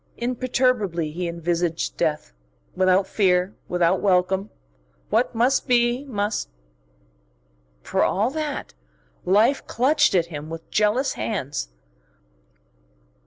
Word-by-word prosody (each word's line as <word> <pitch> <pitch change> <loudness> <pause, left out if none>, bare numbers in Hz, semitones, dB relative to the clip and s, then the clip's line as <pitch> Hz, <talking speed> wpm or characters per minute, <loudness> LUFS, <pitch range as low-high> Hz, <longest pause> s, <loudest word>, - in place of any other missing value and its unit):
Imperturbably 240 -9 0
he 175 +3 -3
envisaged 170 0 -2
death, 150 - -2 0.4
without 185 +1 +3
fear, 190 -1 +1
without 175 -1 +1
welcome. 190 +1 +1 0.6
What 230 +3 +1
must 250 +5 +2
be, 240 +2 +2
must.... 205 - -2 1.3
For - - 0
all 215 +6 +1
that, 305 -1 -4 0.5
life 220 +9 +3
clutched 265 -1 +2
at 170 -2 +3
him 150 +1 -6
with 165 0 -9
jealous 215 +6 +2
hands. 140 - -3
200 Hz, 100 wpm, -23 LUFS, 175-240 Hz, 1.3 s, without